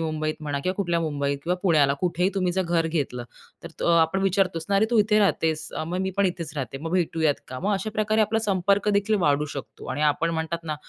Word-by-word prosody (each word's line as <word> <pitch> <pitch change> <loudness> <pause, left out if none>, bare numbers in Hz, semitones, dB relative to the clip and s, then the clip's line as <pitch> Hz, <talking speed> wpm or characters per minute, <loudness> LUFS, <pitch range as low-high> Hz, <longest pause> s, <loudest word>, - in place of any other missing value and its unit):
मुंबईत 155 0 -2
म्हणा 145 -1 -2
किंवा 185 +1 0
कुठल्या 175 -4 0
मुंबईत 140 -3 -1
किंवा 175 +2 0
पुण्याला 150 -7 +4
कुठेही 180 +1 +1
तुम्ही 185 -2 0
जर 190 - +1
घर 170 -2 +1
घेतलं 140 -7 -2 0.4
तर - - -7 0.2
अ, - - +3
आपण 165 +4 +1
विचारतोस 185 -4 +1
ना 200 - +1
अरे, 210 +3 +3
तू 235 - +3
इथे 210 0 +4
राहतेस? 160 -6 +1 0.2
मग 180 +2 -3
मी 190 0 -1
पण 200 - +3
इथेच 170 -3 -4
राहते 135 0 -4
मग 165 +2 -5
भेटूयात 160 -4 +1
का? 130 - -6
मग 205 +3 0
अशा 195 +3 -3
प्रकारे 215 0 +1
आपला 215 +1 +2
संपर्क 200 -1 +1
देखील 215 +2 0
वाढू 145 -2 +2
शकतो 135 - -8
आणि 145 - -2
आपण 165 +2 -1
म्हणतात 165 +1 -3
ना, 155 -1 -2
170 Hz, 225 wpm, -25 LUFS, 155-195 Hz, 0.4 s, पुण्याला